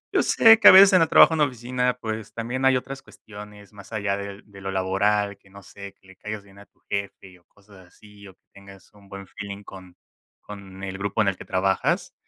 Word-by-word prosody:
Yo - - +4
sé 225 0 +5
que, 210 - +6
a - - +12
veces, 195 +1 +7
en 185 - +5
el 165 - +2
trabajo - - +6
en 160 - -2
la 150 - +4
oficina, 125 0 -3
pues, 110 -2 -7
también 120 +3 -4
hay 130 -1 +3
otras 135 +2 -8
cuestiones 105 -1 -15
más 100 +1 -15
allá 100 -2 -2
del 100 0 -9
de 100 -2 -16
lo 95 - -6
laboral, 100 +2 -1
que, 95 - -25
no 100 +1 -15
sé, 100 +1 -12
que - - -30
le 95 - -17
caigas 105 +1 -8
bien 100 0 -19
a 100 - -15
tu - - -41
jefe 100 -2 -7
o 85 - -35
cosas 100 -3 -21
así, 105 +2 -18
o 95 - -15
que - - -59
tengas 100 0 -17
un 100 -1 -21
buen 100 0 -10
feeling 100 +1 -9
con 95 -3 -14 0.5
con 95 -2 -12
el 95 0 -6
grupo 100 +2 -2
en 100 - +1
el 95 - -6
que - - -12
trabajas, 95 +1 -1
100 Hz, 240 wpm, -23 LUFS, 95-110 Hz, 0.5 s, a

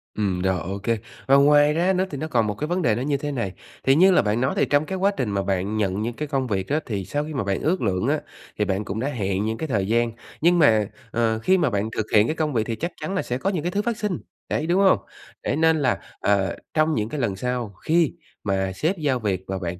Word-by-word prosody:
Ừm, 95 -4 -1
rồi, 95 -1 +1
ô 95 +5 -5
kê. 115 0 +1 0.3
Và 135 - +6
ngoài 145 +1 +6
ra 175 +4 +2
nữa 185 0 +1
thì 145 - -5
nó 155 - -3
còn 115 -7 +1
một 105 - -1
cái 150 +8 -3
vấn 180 +3 0
đề 115 -9 +2
nó 120 - -3
như 140 +1 0
thế 145 +1 -4
này, 115 -9 -3 0.3
thì 135 - +4
như 185 +5 +6
là 180 - +5
bạn 110 +1 0
nói 130 - +1
thì - - +3
trong 145 +1 +2
cái 190 +4 -3
quá 195 +2 +3
trình 125 -5 -1
mà 100 -1 -1
bạn 95 +2 -1
nhận 100 -1 0
những 115 +2 -2
cái 150 +5 -4
công 135 -3 -1
việc 95 -4 -1
đó 150 +2 +2
thì 100 -5 -3
sau 145 +8 -2
khi 155 - -6
mà 135 -6 -1
bạn 100 -1 -1
ước 180 +4 +1
lượng 95 -4 0
á, - - +2 0.4
thì 105 - +1
bạn 100 +1 -1
cũng 100 +3 -4
đã 130 - -1
hẹn 100 -7 -1
những 110 +1 -2
cái 160 - -3
thời 100 -8 0
gian. 115 +2 +2 0.3
Nhưng 175 +2 +4
mà, 110 -9 +4 0.2
ờ, 115 -1 +1
khi 185 +11 +3
mà 160 -6 +2
bạn 105 -1 -1
thực 110 - 0
hiện 105 +1 +6
cái 155 - -1
công 155 -2 -1
việc 115 -3 +2
thì 115 - -2
chắc 170 +9 -3
chắn 155 +6 -3
là - - +1
sẽ 125 - -3
có 185 +9 -1
những 180 -6 -2
cái 175 - -1
thứ 205 - 0
phát 235 0 -2
sinh, 210 -5 -1 0.3
đấy, 155 - -1
đúng 180 +3 +3
hông? 195 -1 +5 0.4
Đấy - - 0
nên 160 +1 +3
là, 130 -3 +2 0.2
ờ, 100 -3 +1 0.2
trong 155 0 +2
những 110 0 -1
cái 150 - -4
lần 110 -7 0
sau 120 0 -3
khi 165 0 +3 0.3
mà 95 -2 0
sếp 165 - 0
giao 140 -5 0
việc 95 -5 -1
và 95 - -2
bạn 90 -1 -4
125 Hz, 290 wpm, -24 LUFS, 105-155 Hz, 0.4 s, Và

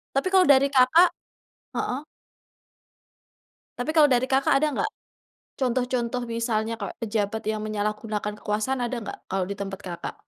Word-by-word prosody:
Tapi 275 +7 +1
kalau 380 -1 +6
dari 275 -1 +6
Kakak 280 +6 +5 0.7
heeh. 265 +4 -2 1.7
Tapi 245 +5 -3
kalau 305 -2 +7
dari 250 +1 +3
Kakak 270 +1 +3
ada 305 +3 +2
enggak? 430 +10 0 0.7
Contoh-contoh 250 -1 0
misalnya 230 -1 -1
kayak 200 -3 -5
pejabat 220 0 -1
yang 215 0 -1
menyalahgunakan 210 0 -2
kekuasaan 215 +5 -1
ada 245 +1 -2
enggak, 215 - -7
kalau 190 -1 0
di - - -2
tempat 195 0 -5
Kakak? 175 -2 -6
235 Hz, 140 wpm, -25 LUFS, 210-265 Hz, 1.7 s, kalau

